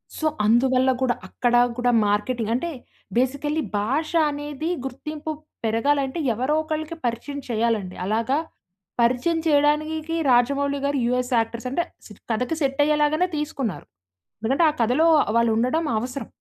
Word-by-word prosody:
So, 315 Hz, -, -4 dB, 0.2 s
అందువల్ల 255 Hz, +3 st, +3 dB
కూడా 250 Hz, -2 st, +2 dB
అక్కడ 245 Hz, -1 st, -1 dB, 0.2 s
కూడా 245 Hz, 0 st, +2 dB, 0.2 s
మార్కెటింగ్ 215 Hz, +2 st, 0 dB
అంటే 340 Hz, +8 st, -2 dB, 0.5 s
బేసికల్లీ 285 Hz, +5 st, 0 dB, 0.2 s
భాష 275 Hz, +10 st, -1 dB, 0.2 s
అనేది 290 Hz, +2 st, -4 dB, 0.2 s
గుర్తింపు 300 Hz, +4 st, -5 dB, 0.3 s
పెరగాలంటే 270 Hz, +6 st, +1 dB
ఎవరో 255 Hz, +7 st, -1 dB
ఒకళ్ళకి 315 Hz, +1 st, -4 dB
పరిచయం 240 Hz, +5 st, -3 dB
చెయ్యాలండి. 220 Hz, -5 st, 0 dB
అలాగా, 230 Hz, +7 st, +1 dB, 0.6 s
పరిచయం 255 Hz, +8 st, +2 dB
చెయ్యడానికీకి 305 Hz, +2 st, +1 dB, 0.2 s
రాజమౌళి 280 Hz, +3 st, +2 dB
గారు 280 Hz, 0 st, 0 dB
యూఎస్ 250 Hz, +1 st, 0 dB
యాక్టర్స్ 230 Hz, +2 st, -3 dB
అంటే 340 Hz, +6 st, +1 dB, 0.2 s
స్ -, -, -16 dB, 0.2 s
కథకి 250 Hz, +7 st, -1 dB
సెట్ 275 Hz, 0 st, 0 dB
అయ్యేలాగానే 300 Hz, +3 st, +2 dB
తీసుకున్నారు. 280 Hz, -, -3 dB, 0.5 s
ఎందుకంటే 260 Hz, +9 st, +1 dB
ఆ -, -, +1 dB
కథలో 250 Hz, +8 st, +3 dB, 0.3 s
వాళ్ళు 235 Hz, 0 st, +3 dB
ఉండడం 255 Hz, +8 st, +1 dB
అవసరం. 250 Hz, +4 st, -4 dB
265 Hz, 130 wpm, -23 LUFS, 235-300 Hz, 0.6 s, అందువల్ల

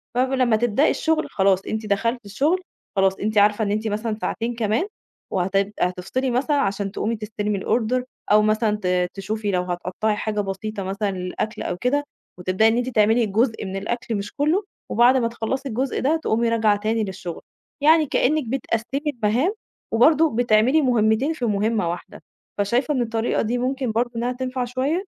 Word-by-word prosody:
فب 255 Hz, +1 st, +2 dB
لمّا 255 Hz, -4 st, +3 dB
تبدئي 240 Hz, +5 st, +2 dB
الشُغل 320 Hz, -1 st, 0 dB
خلاص 195 Hz, -1 st, +2 dB
أنتِ 220 Hz, 0 st, -3 dB
دخلتِ 230 Hz, +3 st, -1 dB
الشُغل 290 Hz, -, +1 dB, 0.3 s
خلاص، 195 Hz, 0 st, +2 dB
أنتِ 215 Hz, +1 st, -1 dB
عارفة 210 Hz, +1 st, +4 dB
إن 200 Hz, -, -1 dB
أنتِ 215 Hz, +2 st, -1 dB
مثلًا 215 Hz, +1 st, -2 dB
ساعتين 235 Hz, +1 st, -2 dB
كمان 230 Hz, -, 0 dB, 0.4 s
وهتد 195 Hz, +2 st, 0 dB
هتفصلي 190 Hz, +9 st, -1 dB
مثلًا 280 Hz, +4 st, +1 dB
عشان 200 Hz, -4 st, -1 dB
تقومي 220 Hz, +4 st, -2 dB
تستلمي 210 Hz, -1 st, -3 dB
الorder 240 Hz, +5 st, 0 dB, 0.3 s
أو 210 Hz, -, +7 dB
مثلًا 215 Hz, 0 st, +1 dB
ت 180 Hz, -1 st, +1 dB
تشوفي 205 Hz, +1 st, -3 dB
لو 180 Hz, -1 st, +1 dB
هتقطّعي 180 Hz, +4 st, -2 dB
حاجة 210 Hz, 0 st, -1 dB
بسيطة 200 Hz, +1 st, -4 dB
مثلًا 200 Hz, +2 st, -2 dB
للأكل 185 Hz, +4 st, -4 dB
أو -, -, -3 dB
كده، 270 Hz, +7 st, +1 dB, 0.4 s
وتبدئي 185 Hz, +5 st, +2 dB
إن 225 Hz, -, +2 dB
أنتِ 245 Hz, +1 st, -1 dB
تعملي 225 Hz, 0 st, +3 dB
جزء 220 Hz, +2 st, 0 dB
من 190 Hz, 0 st, -5 dB
الأكل 225 Hz, +3 st, -3 dB
مش 200 Hz, 0 st, -5 dB
كلّه 305 Hz, +8 st, +1 dB, 0.3 s
وبعد 245 Hz, +4 st, +5 dB
ما 235 Hz, -, +1 dB
تخلّصي 250 Hz, +4 st, -3 dB
الجزء 260 Hz, +3 st, -1 dB
ده 285 Hz, +5 st, +2 dB
تقومي 230 Hz, +1 st, +1 dB
راجعة 220 Hz, -2 st, +3 dB
تاني 220 Hz, +2 st, 0 dB
للشُغل، 190 Hz, -4 st, -6 dB, 0.4 s
يعني 315 Hz, +1 st, +5 dB
كإنِّك 300 Hz, +2 st, +1 dB
بتقسّمي 250 Hz, +1 st, -2 dB, 0.2 s
المَهام 245 Hz, -, +2 dB, 0.4 s
وبرضه 300 Hz, +5 st, +4 dB
بتعملي 245 Hz, +5 st, +4 dB
مُهمّتين 240 Hz, +3 st, +2 dB
في 260 Hz, -6 st, -3 dB
مُهمّة 210 Hz, -3 st, +1 dB
واحدة. 175 Hz, 0 st, -7 dB, 0.3 s
فشايفة 240 Hz, +9 st, +1 dB
إن 255 Hz, -, 0 dB
الطريقة 225 Hz, 0 st, 0 dB
دي 235 Hz, +3 st, -1 dB
ممكن 255 Hz, 0 st, -1 dB
برضه 235 Hz, +2 st, 0 dB
إنّها 240 Hz, +2 st, -1 dB
تنفع 255 Hz, 0 st, -3 dB
شوية؟ 265 Hz, +9 st, -1 dB
225 Hz, 170 wpm, -23 LUFS, 205-250 Hz, 0.4 s, أو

